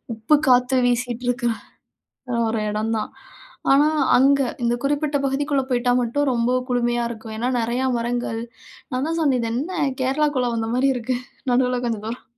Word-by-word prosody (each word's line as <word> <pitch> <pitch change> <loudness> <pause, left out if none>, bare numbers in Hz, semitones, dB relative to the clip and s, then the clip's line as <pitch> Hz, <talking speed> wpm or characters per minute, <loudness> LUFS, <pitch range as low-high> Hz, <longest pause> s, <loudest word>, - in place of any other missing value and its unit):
உப்பு 225 +8 +3
காத்து 250 +1 +4
வீசிட்டுருக்கு, 245 0 -1 1.0
ஒரு 220 -1 -1
இடம் 215 +2 -1
தான். 215 - -4 0.6
ஆனா 285 +2 +5 0.3
அங்க 275 +2 +4 0.2
இந்த 235 0 +2
குறிப்பிட்ட 290 0 0
பகுதிக்குள்ள 280 0 0
போய்ட்டா 245 0 +2
மட்டும், 280 +5 0
ரொம்ப 235 0 +1 0.2
குளுமையா 240 -1 +1
இருக்கும். 220 -1 -8
ஏன்னா, 240 +2 -1
நெறைய 240 +3 -1
மரங்கள் 235 -1 -2 0.5
நான்தான் 315 +6 -1
சொன்னேன் 280 -6 +2
"இது 230 - -2
என்ன 300 +9 -2 0.3
கேரளாக்குள்ள 265 -1 +1
வந்த 225 0 -2
மாரி 265 +2 +3
இருக்கு. 250 +1 -2 0.4
நடுவுல 250 0 +2
கொஞ்சம் 220 -3 -3
தூரம்.". 235 +2 -6
245 Hz, 145 wpm, -22 LUFS, 235-270 Hz, 1.0 s, ஆனா